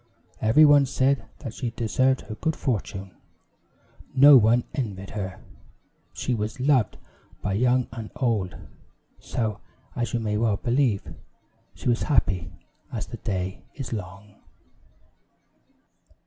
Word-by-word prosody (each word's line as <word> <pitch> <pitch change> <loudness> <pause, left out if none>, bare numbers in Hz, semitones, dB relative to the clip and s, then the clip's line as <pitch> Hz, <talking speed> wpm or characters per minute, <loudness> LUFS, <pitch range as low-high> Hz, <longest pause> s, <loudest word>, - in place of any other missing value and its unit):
Every 115 +8 +6
one 145 -2 +6
said 135 +1 +1 0.2
that 120 -6 -6
she 125 0 -3
deserved 130 +3 +1
her 110 - -8
good 160 +8 -2
fortune; 100 -5 -3 1.0
no 140 +2 +9
one 120 0 +5
envied 100 -7 -4
her; 95 -4 -5 0.7
she 125 - -2
was 110 +3 -3
loved 130 -4 +2 0.5
by 100 - -1
young 125 +4 +2
and 115 -3 -7
old; 110 -8 0 0.6
so, 110 -4 -3 0.4
as 120 -1 -2
you - - +1
may 105 -2 -1
well 110 -2 +1
believe, 120 -4 0 0.6
she - - -6
was 120 -1 +2
happy 90 - +1 0.4
as - - -3
the - - -8
day 95 -2 -3
is 135 -4 -5
long. 100 0 -8
115 Hz, 125 wpm, -25 LUFS, 100-130 Hz, 1.0 s, no